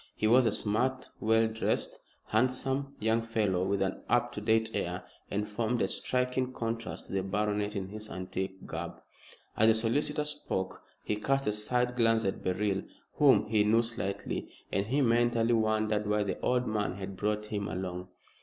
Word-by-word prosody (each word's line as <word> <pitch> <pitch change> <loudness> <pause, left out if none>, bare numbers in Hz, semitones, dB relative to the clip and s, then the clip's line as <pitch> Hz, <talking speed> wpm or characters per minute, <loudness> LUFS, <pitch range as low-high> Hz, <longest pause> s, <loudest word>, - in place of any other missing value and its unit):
He - - -1
was 120 +2 +6
a - - +3
smart, 125 +6 0
well 110 +1 +4
dressed, 110 0 -1 0.3
handsome 130 +4 0
young 110 +1 +2
fellow 110 -5 0
with 95 +1 +1
an 95 0 -2
up 120 0 +3
to 105 - -5
date 110 +1 +2
air, - - -2 0.3
and 105 +1 -1
formed 115 +3 -1
a - - +2
striking 125 0 -1
contrast 115 -1 -4
to - - -9
the 95 - +1
baronet 105 +2 -1
in 95 -1 -3
his 110 +1 -7
antique 95 +1 -4
garb. - - -5 0.6
As 110 - +4
the 110 - +7
solicitor 145 +7 0
spoke 150 -11 -3 0.2
he 105 - -1
cast 135 +5 +1
a 105 - +2
side 125 +4 0
glance 115 -2 +3
at 95 - -2
Beryl, 95 +1 0 0.4
whom - - +6
he 105 -1 +3
knew 110 +3 +4
slightly, 100 -4 -3 0.2
and 100 +1 0
he 140 +5 +2
mentally 120 -1 +3
wondered 110 -1 +1
why 105 0 +2
the 100 - -3
old 125 0 +1
man 105 -4 0
had 100 0 -6
brought 105 +2 -1
him 105 -1 -3
along. 90 -1 -4
110 Hz, 175 wpm, -31 LUFS, 105-120 Hz, 0.6 s, the